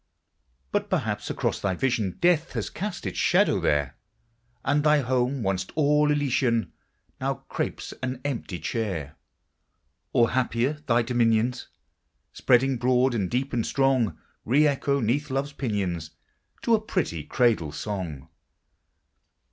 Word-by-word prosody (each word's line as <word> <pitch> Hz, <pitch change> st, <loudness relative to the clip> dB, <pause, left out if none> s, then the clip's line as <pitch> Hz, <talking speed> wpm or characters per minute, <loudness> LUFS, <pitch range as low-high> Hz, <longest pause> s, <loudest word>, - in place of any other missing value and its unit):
But -, -, -1 dB
perhaps -, -, -1 dB
across -, -, -1 dB
thy 95 Hz, -2 st, 0 dB
vision 115 Hz, -5 st, 0 dB
Death 175 Hz, -1 st, +2 dB
had -, -, -3 dB
cast 200 Hz, -, -4 dB
its 95 Hz, -, -3 dB
shadow -, -, +3 dB
there, 70 Hz, -3 st, 0 dB, 0.7 s
And 145 Hz, +2 st, +2 dB
thy 150 Hz, -1 st, +4 dB
home, 125 Hz, 0 st, 0 dB
once 95 Hz, -1 st, -1 dB
all 150 Hz, 0 st, +3 dB
elysian, 130 Hz, -5 st, +1 dB, 0.5 s
Now -, -, -3 dB
crapes -, -, -3 dB
an 130 Hz, 0 st, -3 dB
empty 120 Hz, -9 st, -3 dB
chair; 85 Hz, -, -3 dB, 1.0 s
Or 115 Hz, -1 st, +3 dB
happier, 130 Hz, +3 st, 0 dB
thy 115 Hz, -1 st, +3 dB
dominions, 120 Hz, 0 st, +1 dB, 0.7 s
Spreading 130 Hz, +1 st, +3 dB
broad 125 Hz, +1 st, +2 dB
and 100 Hz, -6 st, -1 dB
deep 130 Hz, +2 st, -1 dB
and 120 Hz, -2 st, +1 dB
strong, 135 Hz, -5 st, +1 dB, 0.3 s
Re 140 Hz, +6 st, +4 dB
echo 140 Hz, -1 st, +1 dB
'neath 140 Hz, +7 st, 0 dB
love's 135 Hz, +2 st, -2 dB
pinions 95 Hz, -, -2 dB, 0.5 s
To 235 Hz, -, +3 dB
a 220 Hz, -, +4 dB
pretty 170 Hz, -, -2 dB
cradle 110 Hz, -, +1 dB
song! 85 Hz, -6 st, -5 dB
125 Hz, 130 wpm, -26 LUFS, 105-140 Hz, 1.0 s, thy